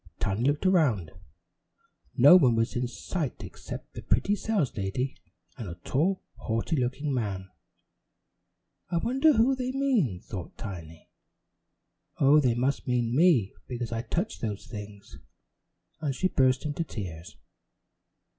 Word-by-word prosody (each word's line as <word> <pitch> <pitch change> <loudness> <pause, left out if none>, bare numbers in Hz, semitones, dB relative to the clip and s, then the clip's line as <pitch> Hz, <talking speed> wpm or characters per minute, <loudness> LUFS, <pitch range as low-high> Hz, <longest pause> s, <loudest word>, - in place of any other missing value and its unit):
Tiny 100 +3 -1
looked 145 +6 +1
around. 135 - +3 1.1
No 180 - +9
one 130 -10 +5
was 115 +1 0
in 125 0 0
sight 145 +3 -4
except - - -9
the - - -7
pretty 205 - +1
saleslady 130 - -1 0.4
and 110 -6 -5
a 85 - -6
tall, 160 - 0
haughty 115 +8 -1
looking 135 +2 -1
man. 95 -6 -3 1.4
"I 170 - 0
wonder 265 - +3
who 245 +3 +4
they 255 0 -2
mean?" 250 - +1
thought 95 -2 -8
Tiny. 85 -6 -9 1.1
"Oh, 145 +2 +6
they 125 -5 +2
must 130 +4 -1
mean 120 -1 +1
me 145 - +4
because 120 -2 -4
I 115 -1 -1
touched 170 - -3
those 105 -3 -4
things," 105 -2 -10 0.8
and 145 -4 -2
she 185 - +1
burst 130 -1 +2
into 150 +3 -1
tears. 90 - -7
125 Hz, 130 wpm, -28 LUFS, 105-170 Hz, 1.4 s, No